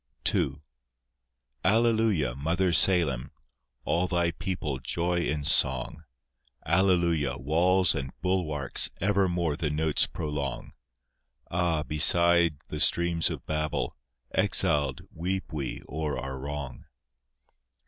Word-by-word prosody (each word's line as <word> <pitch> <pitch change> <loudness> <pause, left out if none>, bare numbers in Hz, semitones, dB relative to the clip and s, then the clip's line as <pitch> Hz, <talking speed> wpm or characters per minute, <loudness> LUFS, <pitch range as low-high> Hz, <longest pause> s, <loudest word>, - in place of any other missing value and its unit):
II 70 - 0 1.1
Alleluia, 110 - +2
Mother 85 +7 0
Salem, 80 -7 +3 0.6
All 90 +2 +1
Thy 85 -1 0
people 80 -8 -4
joy 85 +7 -1
in 75 -3 -2
song; 65 +1 +1 0.6
Alleluia, 85 -6 +2
walls 85 +6 +2
and 65 0 -4
bulwarks 80 -8 +1
Evermore 90 -5 +1
the 75 -1 -2
notes 75 0 +1
prolong: 70 -4 -5 0.8
Ah! 85 -3 0
beside 85 +2 +3
the - - -5
streams 85 -1 +4
of - - -7
Babel, 75 0 -2 0.4
Exiled, 70 -3 +1
weep 90 0 -4
we 70 -4 -5
o'er 75 -1 -3
our 65 0 -6
wrong. 70 -2 -7
80 Hz, 100 wpm, -27 LUFS, 75-90 Hz, 1.1 s, streams